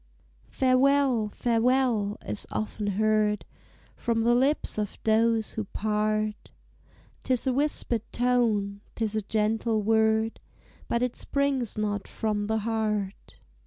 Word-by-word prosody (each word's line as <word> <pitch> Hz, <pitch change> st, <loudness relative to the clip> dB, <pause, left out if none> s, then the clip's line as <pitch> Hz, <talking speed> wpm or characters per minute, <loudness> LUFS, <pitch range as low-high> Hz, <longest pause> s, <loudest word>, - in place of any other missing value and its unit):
"Farewell! 260 Hz, -3 st, +3 dB
farewell!" 230 Hz, -2 st, +1 dB
is 210 Hz, -, -2 dB
often 210 Hz, -1 st, -3 dB
heard 210 Hz, +1 st, +1 dB, 0.5 s
From 230 Hz, -1 st, 0 dB
the 240 Hz, +1 st, +4 dB
lips 265 Hz, -1 st, +2 dB
of 210 Hz, -2 st, -3 dB
those 225 Hz, 0 st, +2 dB
who 220 Hz, -, -3 dB
part: 215 Hz, +1 st, -1 dB, 0.7 s
'Tis 255 Hz, -1 st, 0 dB
a 260 Hz, -, +2 dB
whispered 270 Hz, -4 st, -1 dB
tone, 225 Hz, -5 st, +1 dB
'tis 220 Hz, -2 st, -2 dB
a 215 Hz, -, +1 dB
gentle 215 Hz, +1 st, 0 dB
word, 220 Hz, +1 st, +2 dB, 0.5 s
But 235 Hz, +1 st, 0 dB
it 250 Hz, -1 st, -1 dB
springs 275 Hz, -6 st, -1 dB
not 205 Hz, -1 st, -2 dB
from 210 Hz, -2 st, -2 dB
the 220 Hz, +1 st, +1 dB
heart. 215 Hz, -3 st, -2 dB
220 Hz, 120 wpm, -27 LUFS, 210-245 Hz, 0.7 s, the